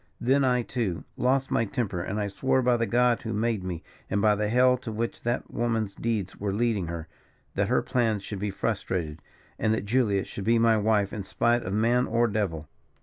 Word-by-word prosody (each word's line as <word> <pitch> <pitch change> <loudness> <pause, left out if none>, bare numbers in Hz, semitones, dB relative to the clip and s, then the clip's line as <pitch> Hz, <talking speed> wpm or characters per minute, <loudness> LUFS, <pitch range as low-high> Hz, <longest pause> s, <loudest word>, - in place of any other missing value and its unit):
Then, 135 +3 +3
I, 125 -2 +2
too, 100 -11 -2
lost 135 +2 +1
my - - +2
temper; 105 -6 -2
and 100 +4 -3
I 105 - -1
swore 130 +6 +1
by 125 0 +4
the 115 -1 0
God 120 0 +3
who 110 -1 -4
made 110 -2 0
me, 85 -4 -5 0.3
and 100 - +1
by 105 +1 +4
the 105 0 -1
hell 125 +2 +5
to 120 -2 -7
which 115 +2 -3
that 120 +1 -2
woman's 115 -4 -1
deeds 110 -5 -3
were 100 -1 -1
leading 105 -3 0
her, 85 -1 -5 0.5
that - - 0
her - - +2
plans 110 -5 0
should 100 -1 -6
be 105 +1 -2
frustrated, 85 -5 -2 0.4
and 110 0 +2
that 100 - -4
Julia 105 -4 +2
should 100 - -7
be 115 +1 +4
my 115 -1 +4
wife 105 -2 +1
in 105 - -3
spite 120 +5 +1
of 95 - -4
man 120 +4 +2
or 120 +1 +2
devil. 95 -8 -2
110 Hz, 210 wpm, -27 LUFS, 100-120 Hz, 0.5 s, hell